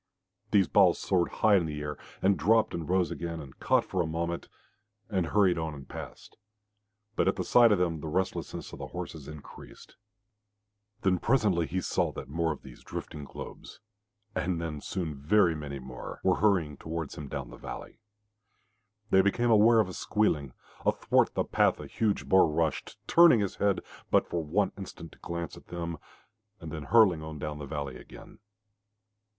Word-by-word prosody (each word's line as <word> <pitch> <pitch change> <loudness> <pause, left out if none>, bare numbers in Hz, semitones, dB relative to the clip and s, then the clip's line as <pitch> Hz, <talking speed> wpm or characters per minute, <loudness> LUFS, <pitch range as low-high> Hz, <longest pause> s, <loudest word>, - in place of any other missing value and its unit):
These 100 -3 +4
balls 95 -4 +5
soared 90 -3 +1
high 105 -2 +4
in 85 -3 0
the 75 -1 -5
air, 75 0 -4 0.3
and 100 +1 +4
dropped 110 +8 +3
and 85 -2 -4
rose 90 -1 +2
again 85 -1 -4
and 70 -3 -11
caught - - +2
for 95 - -1
a 85 - -1
moment, 85 +1 -3 0.6
and 95 -4 +1
hurried 95 -3 +3
on 80 -2 -3
and 70 -2 -11
passed, - - -10 0.8
but - - +2
at - - +3
the - - -2
sight 120 -2 +6
of 105 - +4
them 85 -3 0
the 80 - -5
restlessness 95 +5 -3
of - - -8
the - - -5
horses 75 -4 -7
increased. 75 -1 -12 1.1
Then 95 -2 +3
presently 100 - +2
he 95 +6 -2
saw - - 0
that 65 - -7
more 80 +3 0
of 75 - -7
these 65 -2 -13
drifting 75 -2 -7
globes - - -10 0.5
and 90 -3 -1
then 80 -3 -4
soon 85 -6 -3
very 85 +6 +3
many 75 -2 -6
more 65 -1 -8
were - - +3
hurrying 90 -8 +2
towards 80 -2 -5
him 75 - -7
down 65 -3 -5
the - - -9
valley. - - -8 1.1
They 95 - +7
became 115 +5 +2
aware 115 +1 +6
of 110 - +3
a 90 - -7
squealing. 75 -13 0 0.3
Athwart - - +2
the - - +2
path - - +2
a - - -7
huge 110 -3 -1
boar 95 -3 +5
rushed, 80 0 -1
turning 170 -8 +7
his 100 -2 -2
head 100 -2 +1 0.3
but - - +4
for 85 -2 -2
one 90 +7 +1
instant 90 -3 -9
to - - -19
glance 85 -2 -5
at - - -15
them, 85 -2 -5 0.6
and 80 -3 -8
then 80 -2 -6
hurling 105 -8 +5
on 80 0 -7
down 75 0 -5
the 70 - -6
valley 70 -3 -4
again. - - -14
85 Hz, 180 wpm, -29 LUFS, 75-95 Hz, 1.1 s, They